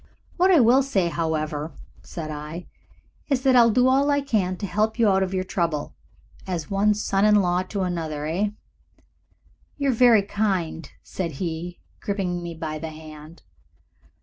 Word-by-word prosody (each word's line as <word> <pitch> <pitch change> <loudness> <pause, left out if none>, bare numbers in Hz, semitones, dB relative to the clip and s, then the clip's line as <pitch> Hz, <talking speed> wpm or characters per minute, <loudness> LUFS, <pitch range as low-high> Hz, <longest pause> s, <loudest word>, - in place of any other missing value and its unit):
"What 365 +2 +4
I 355 -4 +6
will 245 +2 +5
say, 200 -11 0
however," 155 -1 -3 0.3
said 155 -2 -7
I, 150 +4 -7 0.6
"is 265 -3 0
that 265 -2 +4
I'll 235 -1 +7
do 250 +3 +3
all 275 +2 +3
I 285 0 +3
can 205 -9 -1
to 205 - -4
help 215 +3 0
you 230 -2 +3
out 190 -1 +3
of 190 -1 -1
your 185 -1 -1
trouble. 165 -5 -2 0.5
As 175 -3 -4
one 205 +2 +2
son 200 -1 0
in 210 0 +5
law 180 -3 +2
to 195 +2 -4
another, 160 -5 -3
eh?" 180 +7 0 1.3
"You 280 -1 0
are - - +3
very 230 -3 +5
kind," 190 -7 -2
said 170 -4 -4
he, 170 +3 -5 0.2
gripping 185 -4 -2
me 170 -1 -6
by 155 -1 -5
the 160 +1 -5
hand. 155 +1 -12
185 Hz, 170 wpm, -24 LUFS, 160-215 Hz, 1.3 s, I'll